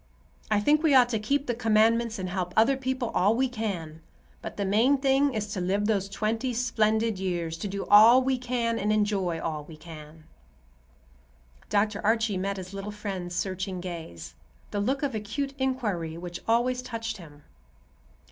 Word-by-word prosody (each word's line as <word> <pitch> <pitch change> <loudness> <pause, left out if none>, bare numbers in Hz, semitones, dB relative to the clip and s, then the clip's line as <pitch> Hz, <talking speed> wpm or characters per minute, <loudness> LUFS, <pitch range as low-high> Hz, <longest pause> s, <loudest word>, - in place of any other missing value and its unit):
I 215 -1 +3
think 295 +8 +3
we 310 -4 +4
ought 250 -2 +6
to 225 -3 -1
keep 275 +6 0
the 245 - -1
Commandments 225 0 +2
and 185 -1 -4
help 180 -1 -3
other 225 +5 +5
people 260 -2 -2
all 205 +5 +3
we 260 +2 +2
can; 190 -10 -5 0.4
but - - -7
the 200 - -1
main 225 +8 +3
thing 270 0 +2
is 215 -1 -1
to 185 - -3
live 195 +3 0
those 200 -2 0
twenty 225 +4 -2
splendid 220 -3 +1
years; 175 -3 -2
to 205 - -4
do 200 0 -4
all 220 +5 +8
we 260 -1 0
can 240 -2 -1
and 210 +1 0
enjoy 200 -5 0
all 155 -2 -3
we 155 0 -12
can." 155 -1 -12 1.5
Dr. 210 0 +1
Archie 220 -1 +2
met 195 +1 -2
his 185 +1 -8
little 195 +1 -5
friend's 195 -4 -5
searching 185 0 -3
gaze, 160 - -7 0.4
the 205 - -2
look 265 +7 -1
of 280 - -1
acute 225 +7 -3
inquiry 210 -12 -2
which 175 0 -7
always 245 +2 +2
touched 225 -2 -5
him. 150 -5 -14
210 Hz, 175 wpm, -27 LUFS, 185-240 Hz, 1.5 s, all